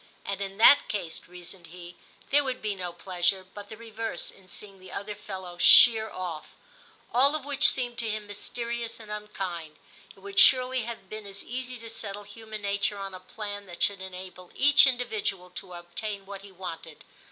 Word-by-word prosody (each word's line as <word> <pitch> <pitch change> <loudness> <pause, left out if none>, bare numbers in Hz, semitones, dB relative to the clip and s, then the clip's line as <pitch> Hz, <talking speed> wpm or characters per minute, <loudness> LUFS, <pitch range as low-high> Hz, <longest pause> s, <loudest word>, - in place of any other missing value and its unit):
*And 200 0 -3
in 195 0 -5
that 260 +6 +7
case/ 185 -6 -4
reasoned 175 0 -11
he, 175 +1 -11 0.2
* - - -28
there 290 +1 +5
would 260 -2 -2
be 215 -1 -2
no 180 -2 -5
pleasure, 180 +1 0
but 205 0 -9
the 220 - -9
reverse, 225 -4 -4
in 190 -1 -20
seeing 195 +2 -7
the 185 0 -13
other 205 +1 -5
fellow 190 -4 -8
sheer 220 +3 +8
oflf.* 170 -4 -5 0.7
All 275 +5 +5
of 300 -3 -4
which 285 0 +5
seemed 245 -2 -2
to 230 - 0
him 215 0 -3
mysterious 235 +3 -4
and 215 -2 -11
unkind. 185 -7 -5 0.2
* - - -20
It 195 - -20
would 200 0 -1
surely 255 -2 +6
have 230 -5 -7
been 215 +1 -8
as 200 0 -7
easy 255 +1 -5
to 230 0 -10
settle 205 -2 -5
human 215 0 -9
nature 200 0 0
on 195 -1 -6
a 185 - -8
plan 205 +1 -7
that 175 -1 -4
should 200 -2 +2
enable 185 -1 -9
each 285 0 +8
individual 215 -7 -2
to 180 0 -9
obtain 195 +4 -5
what 200 0 -8
he 200 0 -13
wanted.' 170 -4 -8
200 Hz, 195 wpm, -28 LUFS, 185-225 Hz, 0.7 s, sheer